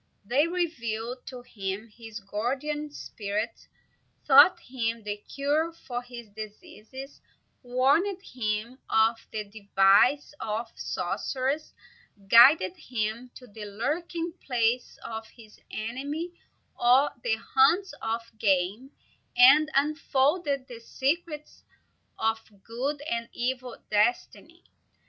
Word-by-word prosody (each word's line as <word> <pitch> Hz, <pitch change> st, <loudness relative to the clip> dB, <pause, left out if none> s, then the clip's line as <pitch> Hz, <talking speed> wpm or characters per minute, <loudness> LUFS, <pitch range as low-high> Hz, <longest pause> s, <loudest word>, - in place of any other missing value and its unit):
They 275 Hz, +9 st, +3 dB
revealed 250 Hz, -9 st, -3 dB
to 250 Hz, -2 st, -8 dB
him 200 Hz, -1 st, -5 dB
his 225 Hz, 0 st, -10 dB
guardian 265 Hz, +9 st, -3 dB
spirit, 215 Hz, -5 st, -5 dB, 0.6 s
taught 290 Hz, +6 st, +8 dB
him 230 Hz, -3 st, -3 dB
the 205 Hz, 0 st, -3 dB
cure 290 Hz, +8 st, -1 dB, 0.2 s
of 245 Hz, 0 st, -3 dB
his 240 Hz, -2 st, -9 dB
diseases, 220 Hz, +5 st, -10 dB, 0.4 s
warned 275 Hz, +10 st, +2 dB
him 230 Hz, -, -3 dB
of 220 Hz, +1 st, +4 dB
the 215 Hz, -1 st, -3 dB
devices 200 Hz, +7 st, +3 dB
of 225 Hz, +2 st, -3 dB
sorcerers, 275 Hz, +4 st, -2 dB, 0.5 s
guided 230 Hz, -, +7 dB
him 230 Hz, +1 st, -3 dB
to 255 Hz, -, -11 dB
the 215 Hz, -2 st, -9 dB
lurking 330 Hz, -, -3 dB
places 245 Hz, -1 st, 0 dB
of 225 Hz, 0 st, -6 dB
his 220 Hz, -2 st, -16 dB
enemy 280 Hz, +10 st, -4 dB, 0.4 s
or 255 Hz, +4 st, +4 dB
the 235 Hz, -2 st, +1 dB
haunts 275 Hz, -, +3 dB
of 225 Hz, +1 st, -1 dB, 0.2 s
game, 200 Hz, +5 st, +1 dB, 0.5 s
and 280 Hz, +5 st, +8 dB
unfolded 285 Hz, 0 st, +1 dB
the 240 Hz, -2 st, -9 dB
secrets 300 Hz, +5 st, -3 dB, 0.5 s
of 225 Hz, 0 st, +1 dB, 0.2 s
good 275 Hz, +6 st, -3 dB
and 235 Hz, -6 st, -3 dB
evil 250 Hz, 0 st, -3 dB
destiny. 240 Hz, -, 0 dB
245 Hz, 105 wpm, -27 LUFS, 220-285 Hz, 0.6 s, taught